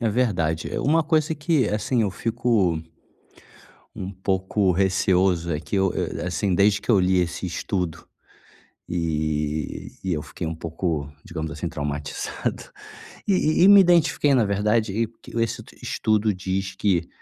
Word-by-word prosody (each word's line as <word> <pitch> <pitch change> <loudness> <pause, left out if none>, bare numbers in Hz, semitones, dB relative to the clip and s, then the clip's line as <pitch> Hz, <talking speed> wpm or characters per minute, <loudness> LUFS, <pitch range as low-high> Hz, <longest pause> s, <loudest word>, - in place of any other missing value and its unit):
É 115 - +1
verdade. 90 -9 0
É - - -1
uma 160 +3 +3
coisa 155 -1 +1
que, 150 -6 +1
assim, 110 +3 0
eu 100 - 0
fico 110 -7 0 1.2
um 95 +1 -5
pouco 95 +1 0
receoso 95 -2 +2
é 75 - -2
que 80 +6 -5
eu, 95 -1 +2
eh, - - -3
assim, 90 +1 0
desde 100 0 +3
que - - -15
eu 105 -4 +5
li 90 0 +3
esse 85 +1 -2
estudo, 90 -1 -3 0.8
e 75 -3 -2
e 95 - 0
eu 75 -2 -1
fiquei 75 +3 -6
pouco, 80 -2 -3 0.2
digamos 80 -2 -5
assim, - - -4
traumatizado. 75 0 -4 0.6
E 200 - +3 0.3
e - - +7
e - - +8
me 200 0 +9
identifiquei 170 -5 +3
na 120 -4 +4
verdade, 105 +2 +1
e 115 +1 0
porque 115 - -16
esse 115 - -1
t - - -18
estudo 110 -1 +1
diz 95 +1 -3
que, 90 -4 +1
95 Hz, 155 wpm, -24 LUFS, 85-110 Hz, 1.2 s, me